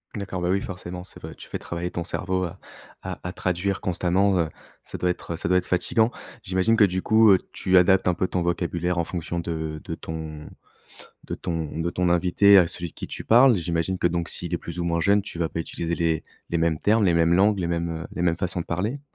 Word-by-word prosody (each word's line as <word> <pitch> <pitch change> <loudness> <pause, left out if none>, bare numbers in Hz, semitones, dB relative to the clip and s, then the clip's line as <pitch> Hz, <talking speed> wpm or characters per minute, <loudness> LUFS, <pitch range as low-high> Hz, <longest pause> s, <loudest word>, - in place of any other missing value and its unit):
D'accord, 95 -3 -4
bah, 90 - 0
oui, 95 +2 +2
forcément, 90 -2 -7
c'est - - -6
vrai, - - -8
tu - - -12
fais - - -5
travailler 85 +1 -5
ton 85 - -3
cerveau 95 +1 -1
à 85 - -7 0.5
à 95 -2 -5
à 90 - -4
traduire 95 +1 -1
constamment, 95 +2 +1
heu, 80 -2 +1 0.3
ça - - -8
doit 90 - +1
être, 85 - -6
heu, - - -5
ça - - -3
doit 90 +2 +4
être - - -7
fatigant. 110 +5 +2 0.3
J'imagine 95 +5 +1
que, 115 - +5
du 95 -2 +1
coup, 110 0 +5
heu, 95 - +7 0.2
tu 95 0 +2
adaptes 95 +1 +4
un 90 - +3
peu 95 - 0
ton 90 - -1
vocabulaire 85 0 -1
en 85 - +2
fonction 85 0 -4
de 80 -2 -4
de - - -5
ton 80 -2 -7 0.8
de - - -4
ton 80 -3 -4
de 80 +1 -1
ton 90 0 0
invité 90 +3 +5
à 90 - +5
celui 85 0 -5
qui - - -7
tu - - -7
parles. 120 +1 +6
J'imagine 85 +1 -1
que - - +1
donc 85 0 -1
s'il 90 0 -4
est 85 - 0
plus 85 +1 -8
ou 85 - -1
moins 85 -1 0
jeune, 100 +3 +3
tu 95 - -9
vas 85 -1 0
pas - - -6
utiliser 85 +1 -3
les 85 -2 0 0.3
les 85 - +1
mêmes 80 -2 +1
termes, 110 +1 +3
les 85 - +3
mêmes 85 0 +3
langues, 100 +3 +4
les 90 - -1
mêmes, 85 -1 -2
heu, - - -6
les - - -4
mêmes 85 -2 +2
façons 90 0 -1
de - - -6
parler? 105 +11 -2
90 Hz, 250 wpm, -24 LUFS, 85-95 Hz, 0.8 s, heu